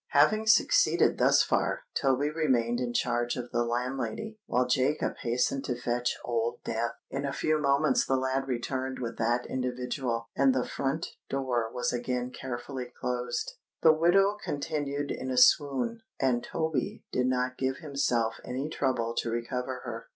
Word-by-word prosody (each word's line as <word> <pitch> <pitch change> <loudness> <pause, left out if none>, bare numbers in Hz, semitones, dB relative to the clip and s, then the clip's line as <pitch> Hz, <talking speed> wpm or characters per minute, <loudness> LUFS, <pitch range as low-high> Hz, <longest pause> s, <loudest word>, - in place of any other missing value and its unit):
Having 215 +10 +4
succeeded - - +4
thus - - +5
far, - - 0
Toby 140 +1 +1
remained 125 -7 +1
in 125 -1 -1
charge 120 0 0
of 125 -1 -6
the 120 0 +1
landlady, 130 - -3
while 125 +1 +2
Jacob 130 +4 +1
hastened 125 +3 0
to 125 -1 -2
fetch 120 0 -1
Old 120 0 -1
Death. 115 +1 -1 0.2
In 140 - -2
a 140 - -1
few 155 +2 +1
moments 150 - +3
the 135 - +1
lad 130 +1 -1
returned 130 +1 -2
with 120 -2 -5
that 120 +2 +1
individual; 125 -2 -2
and 135 -1 +4
the 125 - +1
front 140 +4 -2 0.2
door 125 -4 -1
was 125 0 -1
again 125 +1 -2
carefully 125 0 -6
closed. 125 -1 -2 0.3
The 160 - +8
widow 195 +6 +4
continued 145 -1 -2
in 130 - -4
a 130 - -2
swoon; 145 - +4 0.2
and 125 -3 +1
Toby 160 -5 -2
did 125 0 +1
not 130 0 0
give 130 0 0
himself 130 -7 0
any 135 +4 -3
trouble 125 -6 0
to 115 - 0
recover 125 +2 -3
her. 115 -1 -6
130 Hz, 160 wpm, -29 LUFS, 120-140 Hz, 0.3 s, The